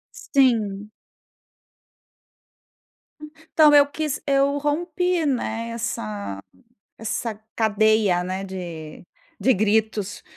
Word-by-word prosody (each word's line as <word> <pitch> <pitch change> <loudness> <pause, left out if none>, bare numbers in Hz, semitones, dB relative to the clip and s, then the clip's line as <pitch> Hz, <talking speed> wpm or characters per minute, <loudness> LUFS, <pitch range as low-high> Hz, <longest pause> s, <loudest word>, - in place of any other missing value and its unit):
Sim. 215 -7 +1 2.3
Hum, 305 0 -10 0.2
então 305 -2 +6
eu 285 -1 +7
quis 300 0 -3
eu 280 0 +2
rompi, 345 +4 0
né, 230 -4 -2
essa 105 - -4 0.6
essa 225 +1 -3 0.2
cadeia, 215 -4 +3
né, 185 +2 -4
de 170 -5 -8 0.4
de 260 - +4
gritos. 215 -1 0
220 Hz, 85 wpm, -23 LUFS, 195-280 Hz, 2.3 s, eu